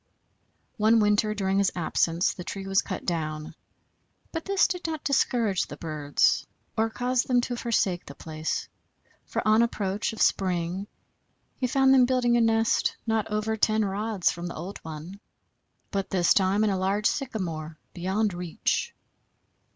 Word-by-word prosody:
One 220 +1 +4
winter 210 0 +2
during 195 -1 +1
his 200 -1 +3
absence 170 0 +1
the 180 - -8
tree 195 +2 -6
was 195 0 +3
cut - - -6
down, 155 -3 -3 0.8
but 325 -1 -4
this 395 0 +3
did 360 -2 -3
not 315 -2 -4
discourage 235 -8 +1
the - - -9
birds, 150 -3 +1 0.3
or 225 0 +1
cause 245 +2 0
them 250 -1 +2
to 245 0 -3
forsake 205 -7 0
the 140 - -9
place, 155 0 -4 0.6
for - - -2
on 215 +1 +5
approach 205 -3 -1
of 220 - -9
spring 185 +1 +1 0.7
he 255 - +1
found 265 +1 +4
them 255 -2 +6
building 245 -2 +2
a 240 - +4
nest 225 0 +2
not 220 -2 0
over 215 +1 -1
ten 215 0 +2
rods 200 -1 0
from 175 0 -6
the 170 - -6
old 180 +5 -6
one, 160 +5 -8 0.7
but 195 -2 -2
this 180 -3 +3
time 195 +2 +2
in 215 - +2
a 190 - -1
large 200 +3 0
sycamore 170 - -2 0.2
beyond 190 +3 0
reach. 175 -2 -2
205 Hz, 160 wpm, -27 LUFS, 180-225 Hz, 0.8 s, them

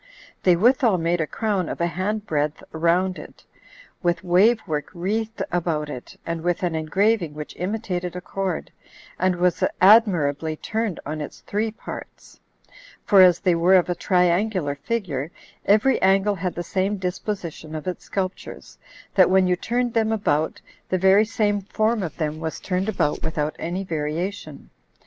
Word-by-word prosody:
They 180 -2 +5
withal 235 +1 +3
made 170 0 0
a 155 - -1
crown 200 -4 -1
of - - -5
a 170 - +2
hand 200 +5 -2
breadth 150 -3 -1
round 175 +3 +1
it, - - -13 0.6
with 175 -1 0
wave 195 +6 +4
work 150 -5 -3
wreathed 220 +5 -2
about 160 -4 -1
it, 125 - -9
and 165 -1 -3
with 175 +2 -1
an 175 -2 0
engraving 170 +1 +1
which 150 0 -7
imitated 180 -2 -3
a - - -3
cord, 190 -2 -3 0.5
and 185 0 +2
was 175 -1 +1 0.2
admirably 170 -8 +4
turned 220 +2 -3
on 155 +1 -4
its 150 - -8
three 215 +2 -1
parts; 220 - -10 0.7
for 200 -3 +6
as 180 -2 +6
they 180 - +3
were 170 +3 +4
of 180 -1 +3
a - - +2
triangular 180 -2 +1
figure, 150 - -3 0.4
every 215 +6 +4
angle 195 +2 +3
had 185 -1 -3
the 175 - -3
same 195 +3 -1
disposition 180 -4 -5
of 155 - -6
its 180 -1 -4
sculptures, 190 -1 -5 0.3
that 185 -2 +5
when 190 0 +4
you 180 0 +2
turned 240 +5 -1
them 225 -1 +1
about, 160 -8 0 0.3
the 185 - +1
very 190 +3 +5
same 205 -2 0
form 215 +3 0
of 175 -4 -5
them 155 -1 -2
was 160 -1 -4
turned 190 +2 -2
about 150 -8 0
without 155 -1 -2
any 180 +4 -3
variation. 165 +3 -4
180 Hz, 165 wpm, -23 LUFS, 165-205 Hz, 0.7 s, for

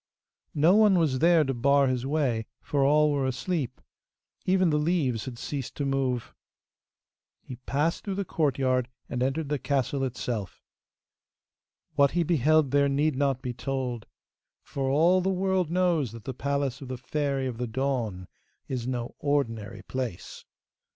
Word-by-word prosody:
No 160 +6 +5
one 210 -3 +5
was 150 -6 +1
there 165 0 +5
to 135 -2 -1
bar 140 +3 +3
his 130 0 -1
way, 135 -7 0 0.2
for 140 -2 +1
all 150 +2 +4
were 140 -2 0
asleep. 130 0 -2 0.7
Even 185 -2 +3
the 150 - +2
leaves 150 -8 0
had 125 -3 -7
ceased 135 0 -5
to 145 - -2
move. 130 -3 -1 1.1
He 125 - -8
passed 150 +4 0
through 195 -2 -3
the 200 0 -2
courtyard, 130 -6 0 0.2
and 125 - -3
entered 135 +3 -1
the 145 -1 0
castle 140 0 0
itself. 120 -6 -4 1.3
What 140 -1 +3
he 175 - +4
beheld 155 -3 +3
there 140 0 +3
need 145 +1 +1
not 135 -1 0
be 125 -2 -3
told, 125 -2 -3 0.6
for 135 -1 -3
all 170 +7 +4
the 190 - 0
world 190 -2 +1
knows 170 - +1
that 115 -2 -10
the 130 - -5
palace 140 0 -2
of 135 - -7
the 130 0 -5
Fairy 140 +1 -2
of 120 -3 -4
the 125 - -2
Dawn 115 -7 -2 0.4
is 125 -2 -3
no 120 -2 -3
ordinary 115 -8 -1
place. 125 -9 -5
135 Hz, 160 wpm, -27 LUFS, 125-155 Hz, 1.3 s, No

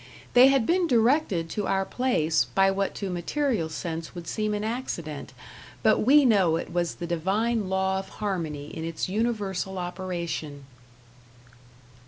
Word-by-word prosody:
They 250 +1 +8
had 270 -4 +3
been 350 +3 +2
directed 235 - +2
to 205 -2 -2
our 195 0 +1
place 165 -13 +1
by 195 0 +3
what 195 0 -1
to 195 -2 -4
material 180 - -1
sense 165 +1 -5
would 170 -2 -8
seem 215 +2 -1
an 205 - -3
accident, 175 - -4 0.5
but 220 - +4
we 280 +4 +5
know 195 -9 +4
it 165 - -4
was 175 -1 -1
the 175 - -5
divine 195 +6 0
law 190 0 +1
of 195 - -8
harmony 160 -8 -4
in 160 - -5
its 165 -1 -3
universal 200 -3 -2
operation. 175 -5 -4
190 Hz, 150 wpm, -26 LUFS, 170-225 Hz, 0.5 s, They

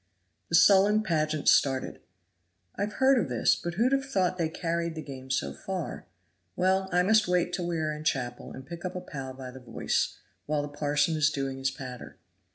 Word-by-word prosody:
The 165 - +2
sullen 205 +4 +6
pageant 155 -5 -1
started. 135 -2 +3 0.8
"I've 210 +1 -2
heard 265 +1 +4
of 140 - -1
this, 120 -2 +3
but 175 0 -5
who'd 240 +6 +2
have 275 0 +2
thought 185 -6 0
they 165 -2 +1
carried 170 0 -2
the 155 - -5
game 130 -2 -9
so 70 - -1
far? - - -5 0.5
Well, 190 +1 +1
I 180 0 +3
must 215 +1 +4
wait 180 0 +1
till 175 -2 -2
we 170 -1 -1
are 155 -1 -1
in 150 0 -7
chapel 125 -5 -2
and 130 - -9
pick 170 +3 -8
up 185 0 -4
a - - -2
pal 135 -7 -7
by 130 -1 -8
the 130 - -11
voice, 125 - -1 0.3
while 150 -1 0
the 145 - -5
parson 145 +2 +1
is 155 -1 +3
doing 135 -2 -3
his 135 0 +1
patter." 130 -2 -9
160 Hz, 200 wpm, -28 LUFS, 135-180 Hz, 0.8 s, sullen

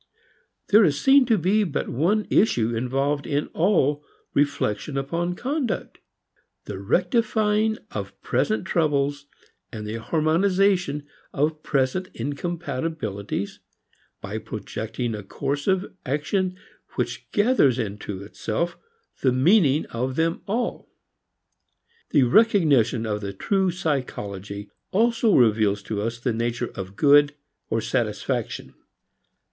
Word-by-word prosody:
There 210 +2 +7
is 145 -5 +2
seen 270 - +5
to 225 -3 +4
be 200 +5 +2
but 165 -7 -2
one 185 - +1
issue 120 - +3
involved 135 +4 -1
in 145 -1 -1
all 150 -5 +2 0.3
reflection 140 -1 0
upon 170 +6 -1
conduct: 260 - -3 0.7
The 100 -2 -6
rectifying 215 - +1
of - - -6
present 215 -3 0
troubles, 145 -5 0 0.4
the 110 -1 -5
harmonizing 170 - +2 0.3
of 150 +2 0
present 140 +8 0
incompatibilities 140 - -3 0.6
by - - -4
projecting 115 +2 -4
a 105 - -5
course 140 +7 -3
of 190 0 +1
action 180 +7 -1 0.4
which - - -3
gathers 205 - +3
into 105 -3 -4
itself 110 +10 -3 0.4
the 130 - +3
meaning 150 - +4
of 130 +3 -2
them 165 +2 0
all. 230 +5 -2 1.2
The 145 -5 +4
recognition 140 - +4
of 105 -1 -2
the 100 -1 -4
true 190 - +1
psychology 105 - -3 0.2
also 225 +1 +3
reveals 105 -4 +3
to 105 0 -3
us 115 +2 -2
the 120 0 -1
nature 120 +1 -2
of 95 0 -7
good 145 +2 +5 0.3
or - - 0
satisfaction. - - -2
145 Hz, 110 wpm, -24 LUFS, 115-185 Hz, 1.2 s, There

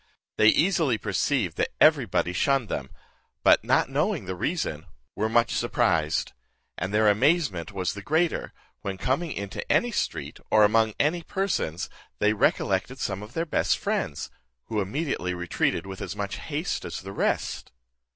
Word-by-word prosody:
They 110 - +5
easily 155 - +3
perceived 105 - 0
that - - -1
every - - +5
body 90 - 0
shunned 135 +4 +1
them; 65 -1 -3 0.5
but - - +6
not - - +3
knowing 150 - 0
the 95 - -3
reason, 90 - -2 0.3
were 110 +2 0
much 115 +1 +3
surprised; 80 0 +1 0.4
and 95 +3 -3
their 105 +1 +3
amazement 105 - +2
was 95 -4 -2
the 100 - -7
greater, 160 - 0 0.3
when 95 -1 -4
coming 140 - -1
into 100 -4 -4
any 240 - +3
street, 75 - -3
or 110 - +5
among 110 +1 +3
any 160 +4 +2
persons, 170 - -2 0.3
they 105 +1 +3
recollected 100 +3 +1
some 100 -6 -3
of 105 +3 -10
their 165 - -1
best 160 - +1
friends, 70 - -2 0.4
who 110 -2 0
immediately 100 - -2
retreated 90 +1 -1
with 95 -1 -8
as - - -4
much 100 -1 -3
haste 155 +4 -3
as 85 - -5
the 95 +1 -8
rest. - - -1
105 Hz, 160 wpm, -26 LUFS, 95-145 Hz, 0.5 s, but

